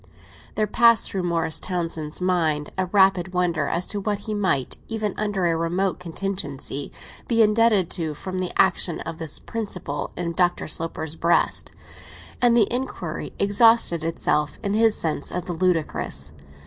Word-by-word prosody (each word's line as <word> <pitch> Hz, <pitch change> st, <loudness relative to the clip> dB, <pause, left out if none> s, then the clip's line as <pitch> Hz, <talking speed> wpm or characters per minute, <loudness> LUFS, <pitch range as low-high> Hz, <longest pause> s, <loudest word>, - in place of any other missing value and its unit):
There 215 Hz, -, +2 dB
passed 230 Hz, +1 st, +4 dB
through 190 Hz, -, -1 dB
Morris 165 Hz, -1 st, 0 dB
Townsend's 165 Hz, -4 st, -3 dB
mind 165 Hz, -5 st, 0 dB
a 185 Hz, -1 st, -1 dB
rapid 190 Hz, -1 st, +3 dB
wonder 170 Hz, -5 st, +1 dB
as 175 Hz, +2 st, 0 dB
to 205 Hz, -, -3 dB
what 205 Hz, 0 st, -1 dB
he 215 Hz, +1 st, -5 dB
might, 185 Hz, -11 st, 0 dB
even 215 Hz, -3 st, -2 dB
under 205 Hz, -3 st, -1 dB
a 165 Hz, -1 st, +2 dB
remote 175 Hz, +4 st, -1 dB
contingency, 165 Hz, -6 st, -4 dB, 0.4 s
be 230 Hz, -2 st, +4 dB
indebted 210 Hz, -4 st, +3 dB
to 160 Hz, -4 st, -2 dB
from 185 Hz, +4 st, -5 dB
the 185 Hz, -1 st, -2 dB
action 180 Hz, -2 st, +3 dB
of 165 Hz, 0 st, -6 dB
this 160 Hz, -3 st, -4 dB
principle 185 Hz, -10 st, -4 dB
in 170 Hz, -1 st, -2 dB
Dr. 175 Hz, 0 st, +1 dB
Sloper's 160 Hz, -1 st, -4 dB
breast, 170 Hz, +1 st, +1 dB, 0.7 s
and 240 Hz, -1 st, +5 dB
the 220 Hz, -, +6 dB
inquiry 220 Hz, -10 st, -4 dB
exhausted 200 Hz, -4 st, +4 dB
itself 150 Hz, -2 st, 0 dB
in 200 Hz, -, -1 dB
his 220 Hz, 0 st, +4 dB
sense 155 Hz, -3 st, -2 dB
of 180 Hz, -1 st, -3 dB
the 180 Hz, -, -3 dB
ludicrous. 160 Hz, -, -1 dB
180 Hz, 155 wpm, -24 LUFS, 165-205 Hz, 0.7 s, the